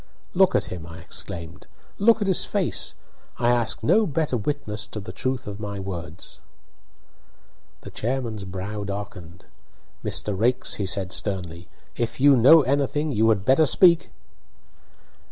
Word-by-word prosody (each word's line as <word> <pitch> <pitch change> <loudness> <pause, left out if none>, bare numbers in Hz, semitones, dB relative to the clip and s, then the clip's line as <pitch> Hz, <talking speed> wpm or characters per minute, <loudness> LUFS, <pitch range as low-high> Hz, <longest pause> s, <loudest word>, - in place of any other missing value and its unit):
"Look - - +4
at - - +2
him!" 85 -2 -7
I 80 -1 -10
exclaimed. 85 +2 -6 0.3
"Look 225 +2 +4
at - - -3
his 190 - +3
face! - - -2 0.4
I 120 0 +1
ask 120 -2 +1
no 215 - +3
better 155 -3 -1
witness 110 -4 -3
to 110 - -7
the 105 - -8
truth 130 0 -3
of 105 0 -7
my 100 -2 -5
words." 90 -3 -7 1.4
The - - -10
chairman's 115 -3 -3
brow 95 +3 -5
darkened. 100 -3 -7 0.6
"Mr. 105 - -2
Raikes," 120 +6 +1
he 100 - -2
said, 95 0 -2
sternly, 90 -4 -4 0.3
"if 120 +1 -3
you 140 +1 +6
know 140 +6 +7
anything 145 +3 0
you 110 -2 +2
had 105 -3 +1
better 135 +4 +4
speak." 170 0 +5
110 Hz, 145 wpm, -24 LUFS, 95-135 Hz, 1.4 s, know